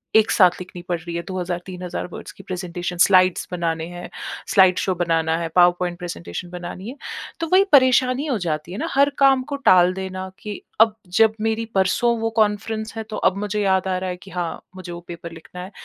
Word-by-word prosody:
एक 220 0 +5
साथ 185 -4 +6
लिखनी 180 -1 -9
पड़ 175 - +1
रही 170 +1 -7
है 170 - -1
2000 180 -2 -3
3000 180 -2 -5
वर्ड्स 175 - -9
की - - -15
प्रेज़ेंटेशन, 180 -1 -5
स्लाइड्स 185 0 +4
बनाने 165 -2 -2
हैं, 175 0 -8 0.4
स्लाइड 190 -2 +5
शो 190 - 0
बनाना 165 -1 +1
है, 170 - -2
पावर 175 0 +7
पॉइंट 175 -1 -2
प्रेज़ेंटेशन 175 - -6
बनानी 180 +4 -7
है। 265 - -8 0.4
तो 330 - -2
वही 385 - +7
परेशानी 255 0 +4
हो 265 -7 0
जाती 165 -2 -3
है 195 - -6
ना - - -2
हर 280 +1 +4
काम 270 -1 +5
को - - 0
टाल 180 0 +6
देना 190 0 -5
कि 210 -1 -7 0.2
अब 220 -1 +5 0.2
जब 220 -1 +6
मेरी 225 +1 0
परसों 210 +5 +2
वो 225 0 0
कॉन्फ्रेंस 215 +1 0
है 225 - -3
तो 215 - -4
अब 190 - +2
मुझे 210 +1 -2
याद 190 -1 +2
आ 185 - 0
रहा 185 0 -3
है 180 - -4
कि 195 - -13
हाँ 175 -2 -3 0.2
मुझे 185 -1 -8
वो 170 - -6
पेपर 170 -1 -8
लिखना 165 +2 -10
है। 190 - -9
185 Hz, 215 wpm, -22 LUFS, 175-215 Hz, 0.4 s, पावर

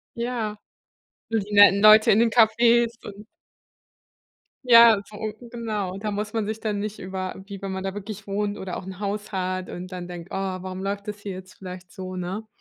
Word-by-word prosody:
Ja, 235 -3 -3 0.7
so 225 -1 +1
die 205 0 -6
netten 205 -1 +7
Leute 215 0 +8
in 210 - +5
den 235 0 +4
Cafés 235 +1 +4 0.2
und 205 +1 -10 1.4
Ja, 230 -3 +8
so 210 - -12 0.3
genau. 215 -6 -4
Da 210 0 -3
muss 210 +2 -4
man 225 -2 -1
sich 220 +1 -4
dann 210 -2 -2
nicht 210 +1 -5
über 185 0 -5
wie 200 -1 -9
wenn 195 -1 -4
man 190 0 -4
da 195 0 -3
wirklich 205 0 -8
wohnt 205 +1 -2
oder 185 -2 -5
auch - - -7
'n 190 0 -8
Haus 205 +1 -4
hat 185 -1 -3
und 180 +1 -7
dann 180 -1 -6
denkt: 175 0 -9
„Oh, - - -4
warum 185 -1 -4
läuft 200 +1 -3
das 210 0 -5
hier 205 -1 -6
jetzt 185 0 -10
vielleicht 180 -1 -10
so, 185 -1 -7
ne?“ 185 +5 -4
200 Hz, 200 wpm, -24 LUFS, 185-215 Hz, 1.4 s, Leute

